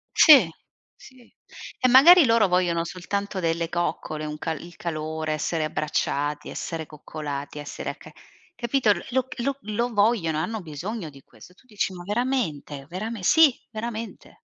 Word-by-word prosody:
Sì, 270 Hz, -, +8 dB, 0.5 s
sì. 255 Hz, -2 st, -18 dB, 0.5 s
E 255 Hz, -, +3 dB
magari 310 Hz, +7 st, +8 dB
loro 230 Hz, -3 st, +4 dB
vogliono 175 Hz, -2 st, +1 dB
soltanto 195 Hz, +3 st, -4 dB
delle 165 Hz, 0 st, -1 dB
coccole, 170 Hz, -3 st, -3 dB
un 150 Hz, 0 st, -6 dB
ca 165 Hz, -, -2 dB
il 170 Hz, +3 st, -9 dB
calore, 155 Hz, -1 st, -3 dB
essere 155 Hz, +1 st, -1 dB
abbracciati, 150 Hz, -1 st, -2 dB
essere 160 Hz, -1 st, -5 dB
coccolati, 150 Hz, -1 st, -7 dB
essere 145 Hz, -, -6 dB
acca -, -, -11 dB, 0.4 s
capito. 240 Hz, -2 st, +2 dB, 0.2 s
Lo 260 Hz, +1 st, 0 dB
lo 275 Hz, +3 st, -1 dB
lo 235 Hz, +3 st, -2 dB
vogliono, 205 Hz, -7 st, +2 dB
hanno 220 Hz, +6 st, -3 dB
bisogno 170 Hz, +4 st, -6 dB
di 135 Hz, -1 st, -16 dB
questo. 180 Hz, -, -17 dB
Tu 255 Hz, -, -26 dB
dici: 210 Hz, -4 st, -2 dB
"Ma 175 Hz, -, -8 dB
veramente? 200 Hz, -, -2 dB
Verame", 210 Hz, +3 st, -5 dB
sì, 320 Hz, -, +6 dB, 0.2 s
veramente. 225 Hz, 0 st, -7 dB
180 Hz, 145 wpm, -24 LUFS, 155-235 Hz, 0.5 s, Sì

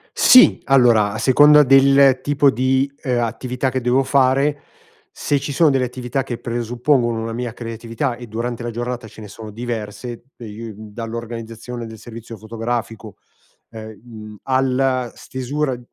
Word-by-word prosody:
Sì! 255 Hz, 0 st, +6 dB
Allora, 120 Hz, -6 st, +4 dB
a 110 Hz, -, -5 dB
seconda 145 Hz, +5 st, +6 dB
del 135 Hz, -1 st, +5 dB
tipo 145 Hz, 0 st, +3 dB
di, 130 Hz, +2 st, 0 dB
uhm, 125 Hz, -2 st, 0 dB
attività 125 Hz, +3 st, -2 dB
che 130 Hz, -, -2 dB
devo 125 Hz, +2 st, +2 dB
fare, 135 Hz, +2 st, +1 dB, 0.5 s
se 145 Hz, -, -1 dB
ci 140 Hz, +1 st, -5 dB
sono 155 Hz, +2 st, +3 dB
delle 135 Hz, -2 st, +1 dB
attività 125 Hz, +1 st, -3 dB
che 120 Hz, -3 st, -6 dB
presuppongono 120 Hz, 0 st, -1 dB
una 115 Hz, 0 st, -4 dB
mia 120 Hz, 0 st, -4 dB
creatività 115 Hz, +2 st, -4 dB
e 120 Hz, 0 st, -10 dB
durante 115 Hz, +2 st, -4 dB
la 120 Hz, -, -4 dB
giornata 120 Hz, 0 st, -5 dB
ce 110 Hz, -, -14 dB
ne 105 Hz, -, -10 dB
sono 105 Hz, +2 st, -10 dB
diverse, 115 Hz, +1 st, -6 dB
de 115 Hz, 0 st, -9 dB
uhm, 110 Hz, 0 st, -11 dB
dall'organizzazione 115 Hz, +1 st, -7 dB
del 110 Hz, 0 st, -11 dB
servizio 115 Hz, 0 st, -10 dB
fotografico 115 Hz, 0 st, -5 dB, 0.5 s
e 110 Hz, -2 st, -10 dB
mhmm, 110 Hz, -3 st, -11 dB
alla 130 Hz, -1 st, 0 dB
stesura 130 Hz, +1 st, -4 dB
120 Hz, 150 wpm, -19 LUFS, 115-130 Hz, 0.5 s, Sì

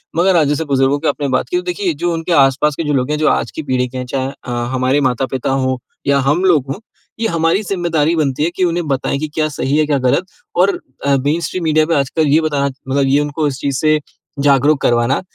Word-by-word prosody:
मगर 180 Hz, +2 st, +3 dB
आज 155 Hz, -4 st, +4 dB
जैसे 150 Hz, +3 st, -1 dB
बुजुर्गों 135 Hz, 0 st, +1 dB
की 160 Hz, -, -2 dB
आपने 145 Hz, -, -1 dB
बात 130 Hz, -, 0 dB
की, 360 Hz, -, 0 dB
तो 360 Hz, -, -2 dB
देखिए 360 Hz, -1 st, -1 dB
जो 175 Hz, -, -2 dB
उनके 165 Hz, +1 st, -3 dB
आसपास 140 Hz, +1 st, +3 dB
के 165 Hz, -, -3 dB
जो 150 Hz, -1 st, -1 dB
लोग 130 Hz, +1 st, 0 dB
हैं, 150 Hz, -, 0 dB
जो 155 Hz, -, +1 dB
आज -, -, 0 dB
की 160 Hz, -, -6 dB
पीढ़ी 130 Hz, -2 st, 0 dB
के 130 Hz, +1 st, -8 dB
हैं, 125 Hz, -, -4 dB
चाहे 130 Hz, +1 st, -2 dB, 0.2 s
अ, 125 Hz, -, -6 dB, 0.2 s
हमारे 130 Hz, +2 st, +1 dB
माता-पिता 130 Hz, 0 st, -1 dB
हो 130 Hz, -1 st, 0 dB, 0.3 s
या 140 Hz, 0 st, +3 dB
हम 155 Hz, +7 st, +2 dB
लोग 155 Hz, -8 st, +3 dB
हो, -, -, -10 dB, 0.4 s
ये 225 Hz, -, +1 dB
हमारी 165 Hz, +1 st, +1 dB
ज़िम्मेदारी 170 Hz, -5 st, 0 dB
बनती 150 Hz, -2 st, 0 dB
है 165 Hz, -, +2 dB
कि 185 Hz, -, 0 dB
उन्हें 170 Hz, -2 st, 0 dB
बताएँ 140 Hz, 0 st, -1 dB
कि 155 Hz, -, -2 dB
क्या 155 Hz, -1 st, +1 dB
सही 140 Hz, 0 st, -1 dB
है 155 Hz, -, +3 dB
क्या 145 Hz, -2 st, +1 dB
गलत। 130 Hz, +8 st, +1 dB, 0.3 s
और 185 Hz, +3 st, +2 dB, 0.3 s
अ, 140 Hz, -, +3 dB
मेनस्ट्रीम 170 Hz, +4 st, -1 dB
मीडिया 155 Hz, -1 st, +3 dB
पे 165 Hz, -, 0 dB
आज 140 Hz, -2 st, +1 dB
कल 160 Hz, -2 st, 0 dB
ये 150 Hz, +3 st, +4 dB
बताना 145 Hz, -3 st, 0 dB, 0.2 s
मतलब 140 Hz, +1 st, +2 dB
ये 140 Hz, +2 st, +3 dB
उनको 150 Hz, +1 st, -1 dB
इस 135 Hz, -1 st, -4 dB
चीज़ 140 Hz, -2 st, -1 dB
से 155 Hz, 0 st, +3 dB, 0.4 s
जागरूक 140 Hz, +1 st, +4 dB
करवाना 120 Hz, +5 st, +2 dB
145 Hz, 245 wpm, -17 LUFS, 135-165 Hz, 0.4 s, आज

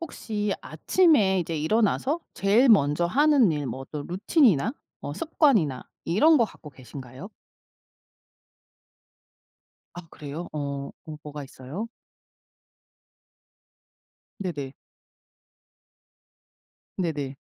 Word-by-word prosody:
혹시 210 Hz, -10 st, -3 dB
아침에 255 Hz, -, +3 dB
이제 165 Hz, -1 st, -3 dB
일어나서 220 Hz, -, +1 dB
제일 215 Hz, +7 st, +3 dB
먼저 150 Hz, -5 st, +4 dB
하는 280 Hz, -, +4 dB
일 145 Hz, -2 st, -3 dB
뭐 130 Hz, +2 st, -5 dB
또 150 Hz, -2 st, -5 dB
루틴이나 205 Hz, -, +2 dB, 0.3 s
뭐 -, -, -5 dB
습관이나 260 Hz, -, +1 dB, 0.2 s
이런 300 Hz, -, +4 dB
것 235 Hz, -, +4 dB
갖고 155 Hz, -7 st, -11 dB
계신가요? 130 Hz, -, -10 dB, 2.7 s
아 175 Hz, -1 st, -9 dB
그래요? 150 Hz, +4 st, -7 dB
어 140 Hz, -2 st, -4 dB
뭐 155 Hz, -1 st, -8 dB
뭐가 150 Hz, -1 st, -7 dB
있어요. 135 Hz, -, -7 dB, 2.5 s
네네. 145 Hz, -8 st, -5 dB, 2.2 s
네네. 145 Hz, -6 st, -2 dB
175 Hz, 180 characters per minute, -26 LUFS, 145-225 Hz, 2.7 s, 먼저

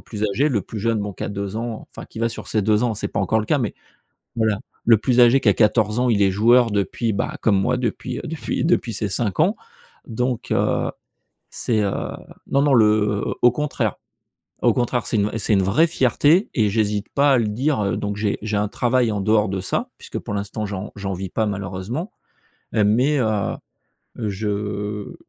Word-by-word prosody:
plus 105 Hz, -1 st, -5 dB
âgé, 120 Hz, +9 st, +1 dB
le 110 Hz, -9 st, 0 dB
plus 110 Hz, -, -7 dB
jeune, 115 Hz, 0 st, 0 dB
bon, 105 Hz, -1 st, -4 dB
qui -, -, -9 dB
a -, -, -3 dB
2 100 Hz, 0 st, -4 dB
ans, 115 Hz, -1 st, -5 dB
enfin, -, -, -8 dB
qui -, -, -10 dB
va 115 Hz, -, +2 dB
sur -, -, -8 dB
ses 110 Hz, -2 st, 0 dB
2 105 Hz, +2 st, +2 dB
ans, 115 Hz, -, 0 dB
c'est 105 Hz, -, -3 dB
pas -, -, -2 dB
encore 110 Hz, -, +1 dB
le -, -, -3 dB
cas, 150 Hz, -, +2 dB
mais 115 Hz, -5 st, -2 dB, 0.6 s
voilà, 110 Hz, -2 st, +1 dB, 0.3 s
le 115 Hz, -2 st, +6 dB
plus 120 Hz, +4 st, +1 dB
âgé 120 Hz, +3 st, +6 dB
qui 105 Hz, -, +4 dB
a -, -, +4 dB
14 110 Hz, +1 st, +2 dB
ans, 125 Hz, 0 st, +2 dB
il 105 Hz, -3 st, +2 dB
est 100 Hz, -, +5 dB
joueur 115 Hz, +5 st, +4 dB
depuis, 105 Hz, +3 st, -1 dB, 0.3 s
comme 100 Hz, -3 st, +3 dB
moi, 125 Hz, -, +1 dB
bah -, -, -4 dB
depuis 125 Hz, +1 st, -3 dB
depuis 165 Hz, 0 st, -3 dB
depuis 145 Hz, -9 st, +1 dB
ses 100 Hz, 0 st, -2 dB
5 105 Hz, 0 st, -2 dB
ans, 185 Hz, +8 st, +3 dB, 0.5 s
donc, 125 Hz, +1 st, -2 dB
heu, -, -, +1 dB, 0.6 s
c'est, 110 Hz, -3 st, 0 dB
heu 100 Hz, -, +1 dB, 0.6 s
non, 140 Hz, +1 st, +2 dB
non, 145 Hz, -2 st, +4 dB
le 105 Hz, -2 st, +3 dB, 0.2 s
au 120 Hz, -, +7 dB
contraire 150 Hz, +3 st, -2 dB, 0.7 s
au -, -, +4 dB
contraire, 120 Hz, -3 st, 0 dB
c'est 115 Hz, -, 0 dB
une 105 Hz, +1 st, 0 dB
c'est 110 Hz, 0 st, +1 dB
une 95 Hz, -, +3 dB
vraie 115 Hz, -, +3 dB
fierté 155 Hz, -, +2 dB
et 110 Hz, -3 st, +2 dB
j'hésite 105 Hz, -1 st, 0 dB
pas 140 Hz, 0 st, +4 dB
à 130 Hz, -, +4 dB
le 110 Hz, -3 st, +1 dB
dire, 110 Hz, -2 st, 0 dB
donc 105 Hz, 0 st, -3 dB
j'ai 105 Hz, -1 st, -1 dB
j'ai 110 Hz, -1 st, -2 dB
un 105 Hz, -, 0 dB
travail 120 Hz, +1 st, +1 dB
en 100 Hz, -, -2 dB
dehors 105 Hz, 0 st, +3 dB
de 95 Hz, -1 st, -2 dB
ça 95 Hz, -, -2 dB
puisque -, -, -6 dB
pour 105 Hz, -, -6 dB
l'instant, 105 Hz, +2 st, -3 dB
j'en 100 Hz, 0 st, -6 dB
j'en 95 Hz, -1 st, -3 dB
vis 95 Hz, 0 st, -5 dB
pas 110 Hz, +2 st, 0 dB
malheureusement 100 Hz, -, -4 dB, 0.6 s
mais, 120 Hz, +8 st, +3 dB
heu, 110 Hz, -5 st, 0 dB, 0.6 s
je 105 Hz, -1 st, -3 dB
110 Hz, 205 wpm, -22 LUFS, 105-120 Hz, 0.7 s, au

